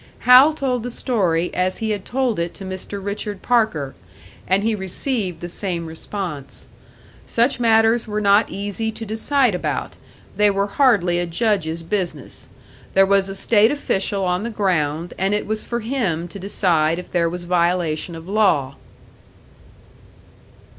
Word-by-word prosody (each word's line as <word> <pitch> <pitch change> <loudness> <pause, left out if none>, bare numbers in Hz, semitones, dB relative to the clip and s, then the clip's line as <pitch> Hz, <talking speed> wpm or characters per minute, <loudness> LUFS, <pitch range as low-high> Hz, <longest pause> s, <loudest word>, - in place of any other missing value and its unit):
Hal 260 +5 +7
told 255 -5 -1
the 245 - -4
story 185 -9 0
as 185 +1 0
he 220 -1 -2
had 205 -2 -3
told 250 -6 -1
it 170 0 -3
to 195 - -9
Mr. 190 +2 -6
Richard 205 -1 -4
Parker; 215 - +1 0.5
and 190 +2 +2
he 225 +1 +1
received 190 - -2
the 175 - -4
same 175 -1 -3
response. 160 -3 -6 0.6
Such 240 +3 +1
matters 225 0 +3
were 210 0 -2
not 205 +1 +4
easy 205 +3 -3
to 225 - -7
decide 230 +3 +1
about; 180 - -3 0.4
they 210 0 +5
were 200 0 +1
hardly 200 -7 +2
a 175 - -2
Judge's 170 -3 -1
business. 185 0 -4 0.5
There 195 0 +6
was 195 0 +2
a 195 - -5
state 215 +1 +3
official 200 -8 -1
on 180 +1 0
the 230 - -3
ground, 175 -6 -1
and 195 +2 +1
it 210 - -2
was 215 +1 -3
for 235 0 -3
him 215 -9 -2
to 200 - -9
decide 170 -5 +1
if 180 - -8
there 170 -2 +1
was 175 +1 -6
violation 175 -2 0
of 165 +1 -10
law. 185 -10 +1
195 Hz, 155 wpm, -21 LUFS, 175-220 Hz, 0.6 s, Hal